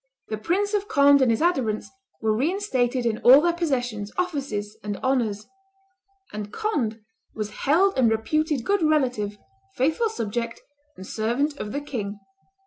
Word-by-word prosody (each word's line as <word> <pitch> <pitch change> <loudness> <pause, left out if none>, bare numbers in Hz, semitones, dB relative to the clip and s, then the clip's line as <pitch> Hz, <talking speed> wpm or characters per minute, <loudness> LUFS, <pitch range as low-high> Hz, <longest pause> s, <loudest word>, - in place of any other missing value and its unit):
The 215 - -2
Prince 395 - 0
of 410 -1 0
Conde 280 -7 +5
and 260 - +4
his 230 +6 +1
adherents 255 -11 0 0.3
were 220 -1 +1
reinstated 260 - 0
in 225 -2 0
all 260 +3 +8
their 340 +2 +2
possessions, 245 -11 -2
offices, 275 - -2
and 205 -1 -3
honors; 230 -6 0 0.9
and 210 -1 -5
Conde 260 - -1 0.4
was 215 -1 -4
"held 340 - +2
and 240 -3 +5
reputed 280 +5 0
good 405 -1 +2
relative, 250 -10 +1 0.4
faithful 315 - +1
subject, 230 - -3 0.4
and 185 - -9
servant 240 +9 -1
of 210 - -5
the 285 - -3
king." 210 -8 -5
255 Hz, 145 wpm, -24 LUFS, 215-310 Hz, 0.9 s, all